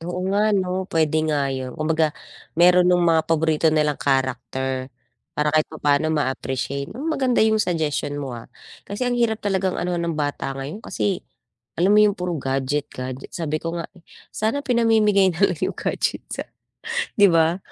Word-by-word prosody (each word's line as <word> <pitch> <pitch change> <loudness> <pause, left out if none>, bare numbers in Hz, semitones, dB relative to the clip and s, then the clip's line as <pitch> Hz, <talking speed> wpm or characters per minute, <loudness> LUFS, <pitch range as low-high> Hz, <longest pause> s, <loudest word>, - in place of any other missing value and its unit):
Oo 175 +2 -4
nga 210 +2 +3
'no, 185 0 -2
pwede 155 -1 +1
nga 140 -2 0
yun. 130 -1 -5
Kumbaga, 155 0 +1 0.4
meron 180 +1 +6
nung 175 -1 +3
mga 165 -1 +4
paborito 160 0 +2
nilang 150 -2 +1
character, 130 -1 -1 0.5
para 150 0 +1
kahit 155 -1 +2
papano 150 0 +1
ma-appreciate. 140 -2 -2
Ah, 265 +7 -7
maganda 260 -8 +2
yung 220 -1 +3
suggestion 155 -5 -1
mo, 140 -3 -4
ah, 115 -1 -9 0.4
kasi 205 +5 -3
ang 245 - 0
hirap 225 -2 +1
talagang 190 -2 0
anuhan 175 -1 -1
ng 165 - -2
bata 145 -2 -2
ngayon 145 +10 -6
kasi, 195 -5 -2 0.6
alam 185 +5 +3
mo 210 - +6
yung 210 -1 +4
puro 180 -2 -2
gadget 135 +1 -1
gadget. 130 +1 -7
Sabi 155 -2 -2
ko 165 +1 -4
nga, - - -5 0.5
sana 225 +7 -1
pinamimigay 215 -6 +3
nalang 185 -2 +2
yung - - -3
gadget - - -2
sa - - -4 0.7
'di 205 - +8
ba? 165 +1 +3
165 Hz, 165 wpm, -22 LUFS, 145-195 Hz, 0.7 s, di